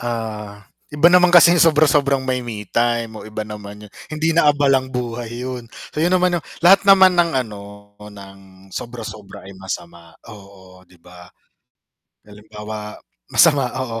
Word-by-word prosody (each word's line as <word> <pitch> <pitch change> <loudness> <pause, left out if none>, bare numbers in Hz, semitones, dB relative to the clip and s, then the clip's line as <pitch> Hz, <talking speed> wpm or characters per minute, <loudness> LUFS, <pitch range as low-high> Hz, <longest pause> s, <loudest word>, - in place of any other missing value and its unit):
Ah, 110 -4 -6 0.3
iba 150 +3 +4
naman 180 0 +5
kasi 175 0 +7
yung 175 - +2
sobra-sobrang 145 -4 +3
may 130 -1 -2
me-time, 115 +1 -2
oh, - - -11
iba 110 0 -6
naman 105 0 -10
'yon. - - -22 0.2
Hindi 155 +1 -1
na 165 -2 +3
abalang 135 -3 +1
buhay 120 -2 -5 0.2
'yon. 125 -2 -7 0.3
Iyon 170 +4 +1
naman 180 0 +1
'yong - - -14 0.2
lahat 195 +3 +7
naman 190 -1 +7
ng, 170 -1 +2
ano, 105 -2 -10 0.4
ng 100 -2 -13 0.3
sobra-sobra 110 -5 -9
ay 100 - -11
masama, 85 -3 -9 0.2
oo, 95 -2 -16
'di 90 - -22
ba. 90 +1 -16 1.0
Halimbawa 105 0 -10 0.3
masama, 145 -6 +3
oo 120 -3 -4
115 Hz, 145 wpm, -19 LUFS, 105-145 Hz, 1.0 s, kasi